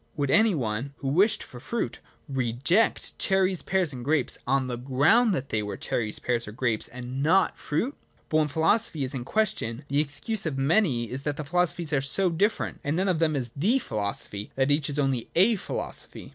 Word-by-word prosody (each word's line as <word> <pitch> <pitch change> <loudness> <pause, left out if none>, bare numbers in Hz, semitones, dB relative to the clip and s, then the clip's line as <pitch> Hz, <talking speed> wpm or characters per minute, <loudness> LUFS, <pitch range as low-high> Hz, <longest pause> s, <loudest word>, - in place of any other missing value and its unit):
Would 140 -2 0
any 220 0 +5
one, 125 +2 -3
who 135 - -3
wished 195 +10 +3
for 125 - -11
fruit, 215 - -3 0.3
reject 135 - 0
cherries, 190 -2 +2
pears, 185 -6 0
and 125 -2 -7
grapes, 145 -1 +1
on 135 +1 +2
the 125 -1 -3
ground 140 - +3
that 135 -3 -4
they 110 - 0
were 105 -1 -5
cherries, 110 -3 -2
pears, 120 -2 -1
or - - -6
grapes, 115 -2 0
and 125 +2 -6
not 170 +6 +3
fruit? 225 - -2 0.3
But 155 - +1
when 155 -1 +3
philosophy 160 +2 +1
is 130 +1 -1
in 125 -3 -4
question, 150 - -1
the 140 +1 +2
excuse 155 +8 -1
of 140 -4 -3
many 135 - +2
is 130 +2 -4
that 145 0 -3
philosophies 175 -1 0
are 140 - +3
so 180 +7 +3
different, 200 +7 0
and 145 +2 -1
none 190 +3 +1
of 175 -4 +1
them 160 -2 +2
is 125 -4 -3
the 205 - +2
philosophy, 105 - -4
— - - -39
that 135 +1 +2
each 145 0 +1
is 145 - -3
only 135 -5 0
a 205 +6 +5
philosophy. - - -5
145 Hz, 200 wpm, -26 LUFS, 125-180 Hz, 0.3 s, any